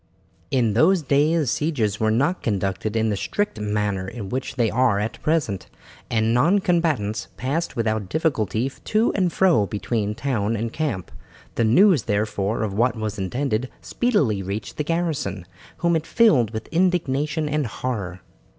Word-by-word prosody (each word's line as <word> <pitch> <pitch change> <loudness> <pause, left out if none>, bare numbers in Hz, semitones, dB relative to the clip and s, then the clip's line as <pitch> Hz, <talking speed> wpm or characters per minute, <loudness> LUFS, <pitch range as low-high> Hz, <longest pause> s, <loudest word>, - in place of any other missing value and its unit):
In 120 -5 +2
those 165 - +4
days 145 +1 +2
sieges 120 -10 -1
were 110 - +2
not 140 +11 +1
conducted 100 0 -2
in 110 0 +2
the - - 0
strict 205 - -2
manner 105 -2 -1
in 100 -1 -6
which 130 +2 -3
they 120 -4 +1
are 125 -3 +3
at 105 +3 -3
present, 150 - 0 0.4
and 110 0 +1
non 155 +11 +4
combatants 165 - 0
passed 145 +7 -2
without 110 -4 -1
difficulty 130 - 0
to 215 - 0
and 185 -3 +1
fro 170 - +3
between 105 0 -2
town 115 -4 -1
and 115 +1 -3
camp. 145 - -3 0.4
The 115 - +1
news, 170 - +5
therefore, 105 0 -1
of 105 -3 -2
what 120 +3 +2
was 110 -2 -4
intended 120 +4 -1
speedily 150 - 0
reached 100 +3 -5
the 150 - 0
garrison, 150 - -2 0.3
whom 170 -1 +1
it 160 -1 -2
filled 150 - +4
with 110 0 -6
indignation 155 -4 +1
and 150 -3 0
horror. 100 -5 -4
120 Hz, 155 wpm, -23 LUFS, 105-155 Hz, 0.4 s, news